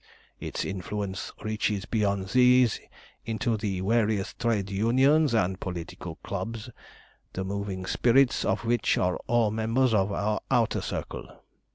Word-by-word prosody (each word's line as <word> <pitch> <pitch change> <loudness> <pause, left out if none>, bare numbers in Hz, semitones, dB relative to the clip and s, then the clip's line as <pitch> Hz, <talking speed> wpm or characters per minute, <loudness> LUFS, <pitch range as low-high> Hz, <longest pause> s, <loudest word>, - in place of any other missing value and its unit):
"Its - - -4
influence 95 0 -4
reaches 105 -2 -1
beyond 100 -4 0
these 125 0 +4 0.4
into 115 +1 -1
the 100 -4 -2
various 105 -1 +1
trade 105 -5 -1
unions 130 +7 +3
and 95 -3 +1
political 85 -2 -6
clubs, 110 +5 -5 0.6
the 95 - -3
moving 95 -1 -4
spirits 125 +6 +3
of 105 +4 -1
which 120 +1 +2
are 90 0 +1
all 115 -3 +2
members 115 +3 +1
of 100 -1 +2
our 105 +1 -1
Outer 120 -4 +2
Circle. - - -5
105 Hz, 130 wpm, -27 LUFS, 95-120 Hz, 0.6 s, these